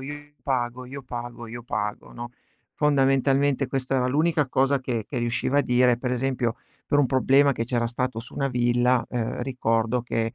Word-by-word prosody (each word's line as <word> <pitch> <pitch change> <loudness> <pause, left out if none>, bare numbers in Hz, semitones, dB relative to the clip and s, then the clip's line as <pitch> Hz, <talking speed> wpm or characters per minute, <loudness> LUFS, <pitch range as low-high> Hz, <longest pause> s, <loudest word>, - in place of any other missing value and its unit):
io 140 +2 -5 0.3
pago, 125 -2 -2
io 135 +2 -8
pago, 120 -2 -7
io 120 +1 -7
pago", 105 -3 -4
no, 120 0 -7 0.5
fondamentalmente 135 -1 +2
questa 135 0 -1
era 125 -1 +2
l'unica 150 +2 +2
cosa 135 +2 +2
che 120 -4 -3
che 130 - -4
riusciva 120 +3 0
a - - +4
dire. 125 -1 +3
Per 125 0 -2
esempio, 125 -2 0 0.3
per 145 - +2
un 140 - +4
problema 135 +2 +4
che 115 - -2
c'era 120 -1 0
stato 120 -1 -2
su 120 - -13
una 140 - 0
villa, 120 0 +2
ehm, 120 -1 -2
ricordo 115 -2 0
che 115 -1 -2
125 Hz, 180 wpm, -25 LUFS, 120-135 Hz, 0.5 s, a